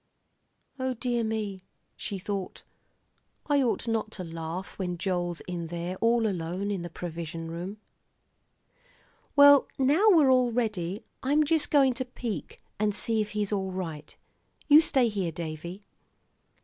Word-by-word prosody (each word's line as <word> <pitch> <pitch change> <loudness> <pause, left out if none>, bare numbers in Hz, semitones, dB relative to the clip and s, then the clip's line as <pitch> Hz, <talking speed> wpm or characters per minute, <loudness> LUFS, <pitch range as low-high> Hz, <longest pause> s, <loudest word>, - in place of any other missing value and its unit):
O 260 0 -1
dear 240 0 -1
me, 215 -3 -3 0.3
she 200 - -4
thought, 195 0 -5 0.8
I 290 -2 +3
ought 245 -1 0
not 225 -1 0
to 185 - -5
laugh 165 +3 -6
when 180 -2 -2
Joel's 175 -2 -2
in 175 -2 -5
there 175 +2 -4
all 230 +1 +3
alone 185 +1 -2
in 195 -3 -2
the 175 - -6
provision 165 -1 -6
room. 180 +5 -5 1.6
"Well, 285 -1 +8
now 290 +11 +4
we're 310 -9 +6
all 250 -2 +4
ready. 210 -5 -2 0.2
I'm 290 +3 +3
just 305 0 +1
going 275 -3 +5
to 255 +2 -4
peek 235 - -5 0.2
and 210 -1 +1
see 220 +2 0
if 210 - -3
he's 210 -1 -1
all 190 -2 -1
right. 165 -5 -6 0.5
You 300 +1 +9
stay 265 -6 +3
here, 195 -6 -2
Davie." 170 +3 -6
205 Hz, 145 wpm, -28 LUFS, 175-245 Hz, 1.6 s, You